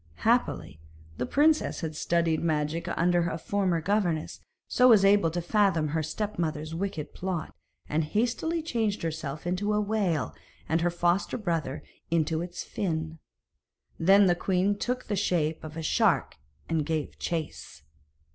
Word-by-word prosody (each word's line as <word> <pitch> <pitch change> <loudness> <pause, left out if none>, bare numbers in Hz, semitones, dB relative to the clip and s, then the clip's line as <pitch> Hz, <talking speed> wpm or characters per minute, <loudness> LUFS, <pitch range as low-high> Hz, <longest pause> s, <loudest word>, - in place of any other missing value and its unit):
Happily, 85 - +1 0.4
the 125 - -2
princess 305 - +2
had 160 -2 -4
studied 165 0 +1
magic 160 +1 -1
under 175 0 +2
a 165 - -3
former 185 -1 0
governess, 175 -4 0 0.3
so 250 - +4
was 215 -5 +7
able 200 -4 +5
to 170 +1 -3
fathom 190 -5 +2
her 160 +2 0
step 205 +6 -4
mother's 155 -1 -2
wicked 170 -3 -4
plot, 180 -3 -4 0.3
and 155 +1 0
hastily 245 - -1
changed 225 - -1
herself 155 -2 -4
into 190 +4 0
a 210 - +2
whale, 200 -8 0 0.3
and 160 +2 +1
her 175 - +2
foster 175 +2 0
brother 165 - -2 0.3
into 160 -1 +1
its 175 0 -5
fin. 160 -4 -3 0.8
Then 195 +4 +6
the 180 - +4
queen 190 +3 +1
took 250 +4 -2
the 210 - -2
shape 165 -5 0
of 155 0 -8
a 165 - -4
shark 155 - +2 0.3
and 160 -2 0
gave 155 0 -3
chase. 160 - -4
170 Hz, 150 wpm, -28 LUFS, 160-200 Hz, 0.8 s, was